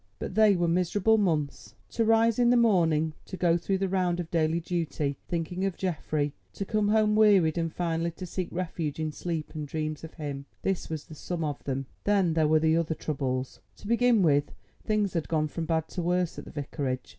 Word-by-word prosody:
But -, -, -5 dB
they 215 Hz, -2 st, +5 dB
were 175 Hz, -1 st, +1 dB
miserable 185 Hz, +6 st, +2 dB
months. 155 Hz, -8 st, -1 dB, 0.2 s
To 230 Hz, -, +1 dB
rise 225 Hz, +1 st, +3 dB
in 240 Hz, -1 st, +5 dB
the 245 Hz, -, +5 dB
morning, 165 Hz, -9 st, +3 dB
to 185 Hz, -, -6 dB
go 170 Hz, -2 st, +3 dB
through 190 Hz, +3 st, 0 dB
the 195 Hz, 0 st, 0 dB
round 180 Hz, -2 st, 0 dB
of 170 Hz, -2 st, -5 dB
daily 165 Hz, 0 st, +2 dB
duty—thinking 165 Hz, +1 st, -3 dB
of 195 Hz, -2 st, -1 dB
Geoffrey; 155 Hz, -5 st, -1 dB, 0.2 s
to 195 Hz, -, -4 dB
come 215 Hz, +1 st, +1 dB
home 210 Hz, 0 st, +3 dB
wearied, 200 Hz, -7 st, +5 dB
and 165 Hz, -1 st, -1 dB
finally 165 Hz, 0 st, -1 dB
to 175 Hz, +2 st, -8 dB
seek 180 Hz, 0 st, -3 dB
refuge 165 Hz, -4 st, -3 dB
in 155 Hz, -1 st, -1 dB
sleep 160 Hz, -1 st, -4 dB
and 150 Hz, -2 st, -5 dB
dreams 155 Hz, 0 st, -3 dB
of 160 Hz, -, -9 dB
him—this 145 Hz, +5 st, -4 dB
was 155 Hz, -2 st, -4 dB
the -, -, -12 dB
sum 165 Hz, +2 st, -4 dB
of 145 Hz, -2 st, -3 dB
them. 135 Hz, 0 st, -2 dB, 0.2 s
Then 195 Hz, -5 st, +3 dB
there 160 Hz, -1 st, +3 dB
were 160 Hz, +1 st, +3 dB
other 160 Hz, -1 st, -1 dB
troubles. 130 Hz, -4 st, -3 dB, 0.2 s
To -, -, -15 dB
begin 235 Hz, -2 st, +4 dB
with, 145 Hz, -2 st, +3 dB, 0.3 s
things 210 Hz, -2 st, 0 dB
had 165 Hz, -3 st, -1 dB
gone 155 Hz, -2 st, +1 dB
from 165 Hz, +2 st, -4 dB
bad 160 Hz, -1 st, 0 dB
to 180 Hz, -, -4 dB
worse 180 Hz, 0 st, 0 dB
at -, -, -9 dB
the -, -, -10 dB
Vicarage. 140 Hz, -3 st, -4 dB
170 Hz, 200 wpm, -28 LUFS, 155-190 Hz, 0.3 s, they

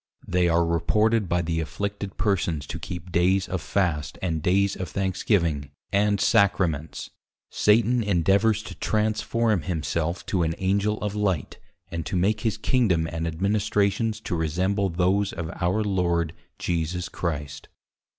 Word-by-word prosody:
They 90 Hz, -1 st, +2 dB
are 85 Hz, 0 st, +3 dB
reported 105 Hz, +5 st, +2 dB
by 85 Hz, 0 st, +1 dB
the 80 Hz, 0 st, -1 dB
Afflicted 100 Hz, +3 st, -4 dB
Persons 90 Hz, -8 st, 0 dB
to -, -, -6 dB
keep 90 Hz, 0 st, -7 dB
dayes 95 Hz, +3 st, +2 dB
of 95 Hz, -3 st, -3 dB
Fast 75 Hz, -3 st, -1 dB
and 80 Hz, -4 st, -2 dB
dayes 100 Hz, +4 st, +2 dB
of 90 Hz, -3 st, -5 dB
Thanksgiving, 90 Hz, -6 st, 0 dB, 0.2 s
and 100 Hz, 0 st, +3 dB
Sacraments; 85 Hz, -8 st, +1 dB, 0.4 s
Satan 115 Hz, +3 st, +3 dB
endeavours 100 Hz, +2 st, +2 dB
to -, -, -8 dB
Transforme 110 Hz, -1 st, 0 dB
himself 85 Hz, +1 st, -2 dB
to 95 Hz, -, 0 dB
an 80 Hz, -1 st, 0 dB
Angel 100 Hz, +3 st, +1 dB
of 105 Hz, -1 st, -2 dB
Light, 100 Hz, -9 st, -1 dB, 0.3 s
and 85 Hz, -1 st, -3 dB
to -, -, -3 dB
make 105 Hz, +4 st, +1 dB
his 110 Hz, -2 st, 0 dB
Kingdom 110 Hz, -8 st, +2 dB
and 80 Hz, 0 st, -2 dB
Administrations 100 Hz, +4 st, 0 dB
to -, -, -3 dB
resemble 95 Hz, +5 st, 0 dB
those 95 Hz, +3 st, +1 dB
of 80 Hz, -1 st, -4 dB
our 95 Hz, +5 st, +1 dB
Lord 85 Hz, -5 st, 0 dB, 0.2 s
Jesus 85 Hz, +1 st, -2 dB
Christ. 75 Hz, -5 st, -4 dB
95 Hz, 140 wpm, -25 LUFS, 85-105 Hz, 0.4 s, are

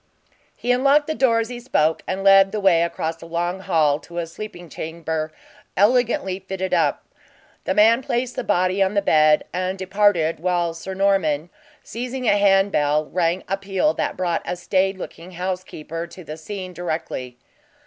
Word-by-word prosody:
He 245 Hz, -, -1 dB
unlocked 275 Hz, +4 st, +4 dB
the 315 Hz, -, -2 dB
door 235 Hz, -6 st, +3 dB
as 225 Hz, -, -5 dB
he 245 Hz, -1 st, -6 dB
spoke, 160 Hz, -10 st, +1 dB
and 190 Hz, +1 st, -3 dB
led 195 Hz, 0 st, +6 dB
the 215 Hz, -, -2 dB
way 190 Hz, -4 st, +4 dB
across 165 Hz, -1 st, -2 dB
a 165 Hz, -, -9 dB
long 175 Hz, +2 st, -2 dB
hall 155 Hz, -6 st, +2 dB
to 170 Hz, +1 st, -12 dB
a 170 Hz, -, -1 dB
sleeping 175 Hz, +1 st, -9 dB
chamber, 160 Hz, -1 st, -4 dB, 0.5 s
elegantly 205 Hz, -3 st, +2 dB
fitter 190 Hz, -1 st, -3 dB
up. -, -, +1 dB, 0.6 s
The -, -, 0 dB
man 225 Hz, +4 st, +5 dB
placed 245 Hz, -1 st, -2 dB
the -, -, -3 dB
body 185 Hz, 0 st, +1 dB
on 195 Hz, +2 st, +2 dB
the 200 Hz, -, +2 dB
bed 155 Hz, -3 st, +4 dB
and 185 Hz, +1 st, -2 dB
departed 190 Hz, -4 st, +1 dB
while 175 Hz, -1 st, 0 dB
Sir 190 Hz, +3 st, -7 dB
Norman, 175 Hz, -5 st, +1 dB, 0.3 s
seizing 250 Hz, +2 st, -5 dB
a 205 Hz, -, +5 dB
handbell, 195 Hz, -7 st, +2 dB
rang 175 Hz, +1 st, 0 dB
a 195 Hz, -, -1 dB
peal 195 Hz, +10 st, 0 dB
that -, -, -3 dB
brought 175 Hz, -2 st, 0 dB
a -, -, -3 dB
staid 190 Hz, +2 st, 0 dB
looking 180 Hz, 0 st, -9 dB
housekeeper 170 Hz, -2 st, -5 dB
to 180 Hz, +2 st, -12 dB
the 155 Hz, -1 st, -7 dB
scene 185 Hz, +3 st, -7 dB
directly. 155 Hz, -7 st, -4 dB
185 Hz, 170 wpm, -22 LUFS, 165-200 Hz, 0.6 s, led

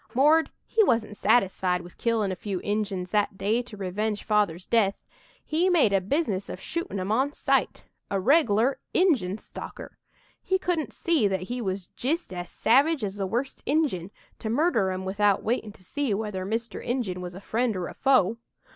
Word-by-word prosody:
'Mord' 305 Hz, +5 st, +5 dB, 0.2 s
he 445 Hz, -, +3 dB
wasn't 225 Hz, -, +1 dB
satisfied 190 Hz, -5 st, +2 dB
with 175 Hz, 0 st, -14 dB
killin' 225 Hz, -4 st, +1 dB
a -, -, -2 dB
few 195 Hz, 0 st, -4 dB
Injuns 200 Hz, -3 st, -2 dB
that 205 Hz, -2 st, +1 dB
day 220 Hz, +5 st, +1 dB
to 240 Hz, -4 st, -11 dB
revenge 205 Hz, +2 st, -2 dB
Father's 205 Hz, -5 st, +1 dB
death. 205 Hz, -4 st, +2 dB, 0.5 s
He 335 Hz, +4 st, +2 dB
made 310 Hz, -, +4 dB
a 195 Hz, -, +3 dB
business 200 Hz, -, -1 dB
of -, -, -6 dB
shootin' 335 Hz, -, -3 dB
'em 185 Hz, +2 st, -2 dB
on 265 Hz, +6 st, +1 dB
sight -, -, 0 dB, 0.3 s
a 195 Hz, -, 0 dB
reg'lar 245 Hz, -, +3 dB, 0.2 s
Injun 255 Hz, -, +3 dB
stalker! -, -, -10 dB, 0.4 s
He 380 Hz, -, +1 dB
couldn't 355 Hz, -5 st, -1 dB
see 325 Hz, -11 st, +1 dB
that 190 Hz, -2 st, -1 dB
he 245 Hz, +6 st, -4 dB
was 190 Hz, -3 st, -3 dB
jist 295 Hz, -, -3 dB
as 175 Hz, -1 st, -5 dB
savage 275 Hz, +5 st, +3 dB
as 200 Hz, 0 st, -3 dB
the 195 Hz, -2 st, -1 dB
worst 245 Hz, +7 st, -3 dB
Injun, 275 Hz, -, +1 dB, 0.3 s
to 220 Hz, -, -4 dB
murder 235 Hz, -, +2 dB
'em 185 Hz, 0 st, -3 dB
without 200 Hz, +1 st, +2 dB
waitin' 225 Hz, -2 st, -1 dB
to 185 Hz, -, -20 dB
see 270 Hz, +1 st, -1 dB
whether 200 Hz, -3 st, -3 dB
Mr. 225 Hz, +2 st, -3 dB
Injun 225 Hz, -8 st, -2 dB
was 180 Hz, -1 st, -7 dB
a -, -, -7 dB
friend 230 Hz, +2 st, -1 dB
or 180 Hz, -1 st, -2 dB
a -, -, -8 dB
foe. 230 Hz, -6 st, +3 dB
215 Hz, 180 wpm, -26 LUFS, 190-265 Hz, 0.5 s, Mord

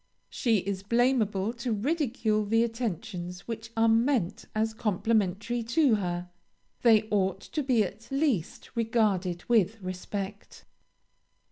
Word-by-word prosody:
She 230 Hz, -3 st, +2 dB
is 195 Hz, 0 st, -3 dB
blameable 225 Hz, -2 st, +1 dB
to 240 Hz, 0 st, -4 dB
ridicule 225 Hz, -3 st, 0 dB
the 225 Hz, +3 st, +2 dB
attentions 185 Hz, -6 st, -4 dB
which 225 Hz, -1 st, -5 dB
are 225 Hz, 0 st, +4 dB
meant 225 Hz, -4 st, +2 dB
as 220 Hz, +1 st, +1 dB
complimentary 215 Hz, +1 st, 0 dB
to 240 Hz, +3 st, +3 dB
her. 180 Hz, -3 st, -2 dB, 0.5 s
They 220 Hz, -3 st, +6 dB
ought 195 Hz, -2 st, +1 dB
to 305 Hz, -, -3 dB
be 255 Hz, -5 st, +3 dB
at 205 Hz, +4 st, -8 dB
least 270 Hz, -, -1 dB
regarded 210 Hz, -7 st, 0 dB
with 225 Hz, -2 st, +3 dB
respect. 195 Hz, +2 st, -6 dB
220 Hz, 120 wpm, -28 LUFS, 195-235 Hz, 0.5 s, They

